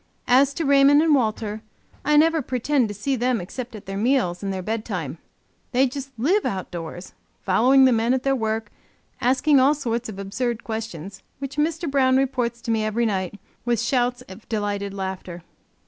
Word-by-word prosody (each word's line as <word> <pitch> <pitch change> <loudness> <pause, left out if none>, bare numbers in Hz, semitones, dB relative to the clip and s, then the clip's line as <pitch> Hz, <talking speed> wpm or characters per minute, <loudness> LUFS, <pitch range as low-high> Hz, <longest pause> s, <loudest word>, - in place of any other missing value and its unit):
As 270 +3 +4
to 330 - -2
Raymond 280 +1 +6
and 320 -2 +4
Walter, 220 -4 0 0.4
I 300 0 +3
never 320 +1 +4
pretend 255 0 0
to 205 - -5
see 265 +7 -1
them 250 -1 +1
except 235 +6 -7
at 210 - -10
their 195 +1 -4
meals 225 -7 +1
and 200 -1 -2
their 190 -1 -4
bedtime; 190 - -4 0.5
they 260 +2 +4
just 270 +1 -5
live 350 - +2
outdoors, 175 -2 -5 0.3
following 255 +8 +5
the 260 - +5
men 230 +2 +2
at 260 - -3
their 270 0 +2
work, 220 -2 -2 0.5
asking 270 +3 +4
all 275 +3 +4
sorts 235 -5 -3
of 205 - -8
absurd 225 +4 -3
questions, 200 -4 -6 0.2
which 275 +1 -7
Mr. 320 +2 0
Brown 265 -2 +3
reports 250 -3 -1
to 230 - -3
me 220 -1 +1
every 215 +2 0
night, 195 -1 -2 0.2
with 240 -2 +1
shouts 245 +1 0
of 210 -2 -14
delighted 205 -2 -2
laughter. 190 -3 -6
235 Hz, 180 wpm, -23 LUFS, 205-270 Hz, 0.5 s, Raymond